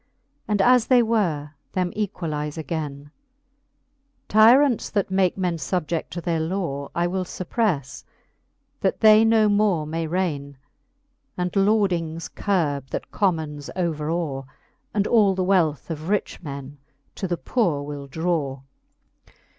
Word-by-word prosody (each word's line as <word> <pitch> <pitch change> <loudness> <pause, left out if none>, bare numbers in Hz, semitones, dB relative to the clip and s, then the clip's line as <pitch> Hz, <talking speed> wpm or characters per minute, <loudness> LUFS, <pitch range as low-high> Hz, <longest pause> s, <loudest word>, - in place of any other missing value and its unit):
And 205 -2 +2
as 250 0 +5
they 250 -2 +5
were, 175 -11 0 0.2
them 180 -1 -1
equalize 160 -7 -3
againe. 145 -2 -5 1.2
Tyrants, 235 +4 +5
that 200 -3 -1
make 190 -1 +2
men 180 -3 -1
fubjed 165 -1 -2
to 175 - -5
their 170 -1 -1
law, 160 -5 -3
I 170 - +1
will 185 +1 -1
fupprelTe, 180 - -2 0.8
that - - -1
they 215 0 +7
no 225 -1 +4
more 205 -6 +2
may 165 +1 -3
raine; 150 -6 -2 0.8
And 180 0 -1
lordings 185 -6 +1
curbe, 145 - -1
that - - -5
commons 155 -7 -1
over 160 -4 -1
aw; 155 -6 -2 0.5
And 205 -1 0
all 210 -5 +4
the 185 - 0
wealth 170 -6 +1
of 160 +2 -5
rich 210 -1 -1
men 140 -2 -8 0.3
to 190 - -4
the 175 -1 -1
poore 165 - 0
will 145 -1 -7
draw, 150 -3 -2 0.7
XXXIX. - - -25
175 Hz, 135 wpm, -23 LUFS, 150-200 Hz, 1.2 s, they